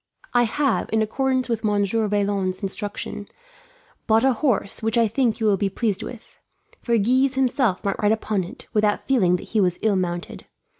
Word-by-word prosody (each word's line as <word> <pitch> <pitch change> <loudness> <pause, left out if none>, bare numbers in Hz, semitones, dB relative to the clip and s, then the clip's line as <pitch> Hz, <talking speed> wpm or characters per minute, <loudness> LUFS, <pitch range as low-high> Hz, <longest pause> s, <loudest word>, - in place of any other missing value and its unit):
"I 240 -1 +4
have, 275 +3 0
in 220 0 +2
accordance 260 +3 0
with 230 -2 -2
Monsieur 210 +1 +1
Vaillant's 200 -2 -1
instructions, 205 +1 -5 0.8
bought 220 +1 +4
a 265 - +4
horse, 235 -6 0
which 225 +1 0
I 230 -1 +4
think 230 0 0
you 220 - -1
will 205 -2 +3
be 195 +1 0
pleased 200 -1 -1
with; 240 -2 -10 0.4
for 235 -1 +1
Guise 255 +5 +2
himself 255 -6 +1
might 200 - -1
ride 210 0 +3
upon 215 -3 0
it, 190 +9 -10
without 210 -1 +1
feeling 195 -10 +3
that 180 - -7
he 220 - +1
was 180 -2 +1
ill 215 -2 +3
mounted. 175 -1 -4
215 Hz, 185 wpm, -23 LUFS, 200-240 Hz, 0.8 s, I